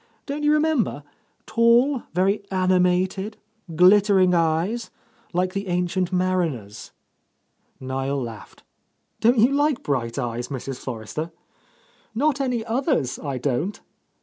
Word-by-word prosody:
Don't 290 Hz, +1 st, -4 dB
you 295 Hz, 0 st, +3 dB
re -, -, +4 dB
member? 295 Hz, -, 0 dB, 0.4 s
Tall, 235 Hz, +4 st, +3 dB
very 190 Hz, +4 st, +1 dB
animated, 185 Hz, +2 st, +1 dB, 0.4 s
glittering 190 Hz, +1 st, +5 dB
eyes, 170 Hz, +8 st, 0 dB, 0.4 s
like 180 Hz, +1 st, 0 dB
the 200 Hz, 0 st, -3 dB
Ancient 180 Hz, +1 st, -1 dB
Mariner's?" 175 Hz, -, -2 dB, 0.9 s
Niel 135 Hz, +1 st, -2 dB
laughed. 115 Hz, -4 st, -8 dB, 0.6 s
"Don't 240 Hz, +3 st, +4 dB
you 235 Hz, +4 st, +5 dB
like 290 Hz, -1 st, +1 dB
bright 120 Hz, -5 st, -2 dB
eyes, 120 Hz, -2 st, -3 dB
Mrs. 135 Hz, -1 st, -5 dB
Forrester?" 130 Hz, +6 st, -5 dB, 0.9 s
"Not 280 Hz, +3 st, +1 dB
any 245 Hz, -4 st, -1 dB
others, 235 Hz, -, 0 dB
I 140 Hz, -3 st, -4 dB
don't!" 145 Hz, -, -2 dB
185 Hz, 115 wpm, -23 LUFS, 140-230 Hz, 0.9 s, glittering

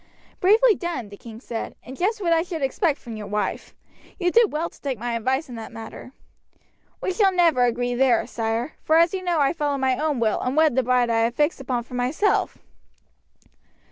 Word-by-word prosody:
"Bravely 440 Hz, +5 st, +5 dB
done," 345 Hz, -, -4 dB
the 200 Hz, -, -10 dB
king 225 Hz, +1 st, -11 dB
said, 235 Hz, -2 st, -6 dB
"and 260 Hz, +3 st, -9 dB
just 410 Hz, -, 0 dB
what 340 Hz, -3 st, +2 dB
I 325 Hz, -, +3 dB
should 330 Hz, -4 st, -5 dB
expect 295 Hz, +3 st, +1 dB
from 230 Hz, -2 st, -9 dB
your 210 Hz, -1 st, -7 dB
wife. 210 Hz, +1 st, -3 dB, 0.4 s
You 355 Hz, -1 st, +1 dB
did 460 Hz, 0 st, +4 dB
well 315 Hz, +3 st, -1 dB
to -, -, -17 dB
take 270 Hz, -4 st, -3 dB
my 240 Hz, +2 st, -3 dB
advice 260 Hz, +6 st, -1 dB
in 250 Hz, -, -10 dB
that 225 Hz, +2 st, -8 dB
matter." 225 Hz, +2 st, -9 dB, 0.9 s
"We 375 Hz, -, -1 dB
shall 395 Hz, -1 st, +3 dB
never 335 Hz, -9 st, +3 dB
agree 245 Hz, +1 st, -1 dB
there, 245 Hz, -2 st, +3 dB
sire, 230 Hz, +3 st, -2 dB
for 315 Hz, -, +3 dB
as 335 Hz, +2 st, +4 dB
you 380 Hz, -, -2 dB
know 350 Hz, -3 st, 0 dB
I 280 Hz, +1 st, +3 dB
followed 290 Hz, -3 st, -1 dB
my 265 Hz, -1 st, 0 dB
own 300 Hz, -4 st, 0 dB
will 225 Hz, -2 st, +1 dB
and 255 Hz, +4 st, -2 dB
wed 310 Hz, -5 st, +4 dB
the 260 Hz, -, +4 dB
bride 250 Hz, -1 st, +2 dB
I 225 Hz, -, +2 dB
had 230 Hz, +1 st, +1 dB
fixed 295 Hz, -1 st, +1 dB
upon 245 Hz, -2 st, -2 dB
for 250 Hz, -, -15 dB
myself." 255 Hz, +12 st, 0 dB
265 Hz, 210 wpm, -23 LUFS, 240-335 Hz, 0.9 s, Bravely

